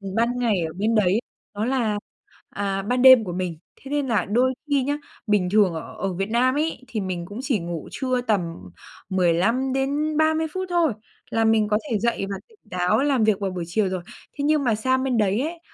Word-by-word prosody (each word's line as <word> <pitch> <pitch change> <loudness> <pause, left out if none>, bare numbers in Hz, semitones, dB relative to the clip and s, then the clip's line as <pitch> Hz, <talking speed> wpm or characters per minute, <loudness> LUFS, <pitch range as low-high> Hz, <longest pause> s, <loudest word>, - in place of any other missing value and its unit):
ban 235 +2 +1
ngày 220 -7 +1
ở 160 - -8
bên 215 +4 0
đấy, 205 0 +3 0.3
nó 210 +2 -2
là, 235 -5 0 0.5
à, 195 -1 -2
ban 245 +5 0
đêm 260 -3 +9
của 180 - -5
mình. 180 -3 -3 0.2
Thế 270 - -10
nên 290 -2 0
là 215 -7 +1
đôi 250 +5 +2 0.2
khi 280 -2 +2
nhá, 290 +2 -1 0.3
bình 200 -4 +2
thường 205 -5 +4
ở 160 - -7
ở 195 -2 -2
Việt 195 +4 -3
Nam 255 +3 +2
ấy, 310 -2 -1
thì 220 -3 -3
mình 180 -2 -3
cũng 205 +6 -8
chỉ 255 -6 0
ngủ 170 -2 -5
trưa 255 -2 -1
tầm 215 -6 +1 0.7
15 190 +9 +2
đến 290 +3 0
30 315 0 +2
phút 375 0 -3
thôi 340 -8 +2 0.4
là 225 0 +1
mình 220 -1 +3
có 210 0 +2
thể 220 -4 0
dậy 235 -3 0
và 195 - -3
tỉnh 445 -2 -24
táo 180 +4 +2
làm 270 -6 +2
việc 215 -3 +3
vào 195 -2 -2
buổi 180 -2 -4
chiều 195 +2 +1
rồi. 185 -1 -3 0.3
Thế 285 - -4
nhưng 300 -1 +2
mà 230 -3 +2
sang 260 +4 +1
bên 255 -3 0
đấy 210 +2 +2
ấy, 330 +3 -4
225 Hz, 220 wpm, -23 LUFS, 195-265 Hz, 0.7 s, đêm